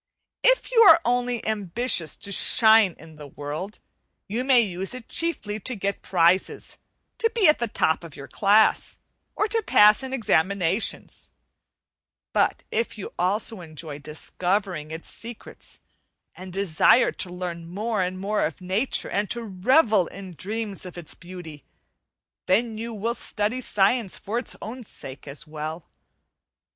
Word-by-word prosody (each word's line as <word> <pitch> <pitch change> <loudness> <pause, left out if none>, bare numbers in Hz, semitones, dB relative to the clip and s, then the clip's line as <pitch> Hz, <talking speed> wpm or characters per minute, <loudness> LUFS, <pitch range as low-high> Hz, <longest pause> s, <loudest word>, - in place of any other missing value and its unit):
If - - +3
you 485 - +3
are 335 -6 +9
only 245 -1 0
ambitious 210 - 0
to 200 - -2
shine 220 -2 +5
in 160 -1 -15
the 150 -1 -10
world, 150 +9 -6 0.5
you 225 +5 -2
may 260 -2 +5
use 190 +1 -3
it 255 -3 -10
chiefly 220 -11 -2
to 250 +5 -1
get 200 -1 -3
prizes, 175 +1 +1 0.4
to 455 - +2
be 435 -5 +4
at 300 - +5
the 235 - -1
top 160 -6 0
of 165 -3 -10
your 140 - -9
class, 210 +2 +3 0.4
or 425 - +1
to 450 +2 +1
pass 210 - +5
in 265 0 -6
examinations; 200 -5 0 1.0
but - - +1
if 230 0 -2
you 205 - -7
also 200 +3 0
enjoy 155 -2 -7
discovering 175 +2 -2
its 160 +1 -8
secrets, 230 0 -9 0.5
and 185 0 -10
desire 195 +6 +3
to 185 - -5
learn 175 -2 -6
more 210 +4 -2
and 185 0 -2
more 205 +2 0
of - - -3
nature 190 +8 -1
and 205 0 -1
to 235 -1 -2
revel 210 - +3
in 190 -1 -9
dreams 210 +3 -5
of 180 -1 -9
its 170 -3 -7
beauty, 170 -4 -11 0.8
then 220 +4 +2
you 230 +2 -5
will 225 +2 -2
study 225 +1 -3
science 210 -2 +1
for 225 +4 -3
its 245 - -5
own 245 +4 -7
sake 135 -9 -10
as 145 +4 -9
well. 155 +1 -6
200 Hz, 150 wpm, -24 LUFS, 175-230 Hz, 1.0 s, are